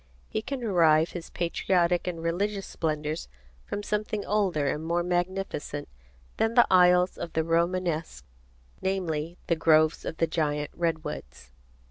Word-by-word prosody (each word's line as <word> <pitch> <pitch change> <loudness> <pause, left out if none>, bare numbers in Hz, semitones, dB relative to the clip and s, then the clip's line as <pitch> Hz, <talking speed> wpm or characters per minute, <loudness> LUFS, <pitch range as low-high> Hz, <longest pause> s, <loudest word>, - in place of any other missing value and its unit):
He 215 - -2
can 265 +3 -5
derive 165 -7 +4
his 175 -2 -7
Patriotic 175 0 +1
and 170 -2 -3
Religious 195 +4 -1
Splendors 155 -1 -3 0.4
from 205 - -4
something 210 0 -2
older 190 -8 +1
and 150 +3 -1
more 170 +1 0
magnificent 175 -4 -2 0.5
than 225 +1 +1
the 240 - +7
aisles 180 0 +5
of 165 - -5
the 160 - +1
Romanesque, 165 - -1 0.6
namely: 175 -3 -2
the 170 - +2
groves 155 -1 +3
of 160 - -5
the 165 - +3
giant 150 -2 -1
redwoods. 150 - -4
170 Hz, 135 wpm, -27 LUFS, 155-185 Hz, 0.6 s, the